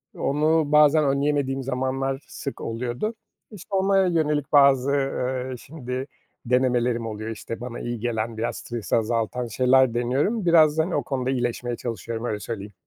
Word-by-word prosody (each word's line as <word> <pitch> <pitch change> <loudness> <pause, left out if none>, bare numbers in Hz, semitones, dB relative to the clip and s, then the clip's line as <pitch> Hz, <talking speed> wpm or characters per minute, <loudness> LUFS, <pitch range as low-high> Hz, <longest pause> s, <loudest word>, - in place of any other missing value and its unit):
onu 155 +1 +1
bazen 150 0 +5
önleyemediğim 140 -1 0
zamanlar 135 +1 -2
sık 140 - -7
oluyordu. 125 - -3 0.4
İşte, 200 -1 -7
ona 195 0 +3
yönelik 150 -4 0
bazı, 140 -2 +5
eee, 130 -2 -1
şimdi 130 -1 -6 0.4
denemelerim 125 -1 +1
oluyor. 110 0 -5
İşte, 115 +1 -6
bana 120 -1 -6
iyi 120 -1 -4
gelen, 115 -1 -2
biraz 110 - -2
stresi 120 -3 -3
azaltan 115 +2 -1
şeyler 130 +1 +3
deniyorum. 135 - 0
Biraz 160 -3 +5
da, 160 - +4
hani, 175 +2 -3
o - - 0
konuda 130 -2 -2
iyileşmeye 120 -1 -1
çalışıyorum, 115 -1 -5
öyle 105 -3 -2
söyleyeyim. 105 -2 -6
130 Hz, 150 wpm, -24 LUFS, 120-145 Hz, 0.4 s, bazen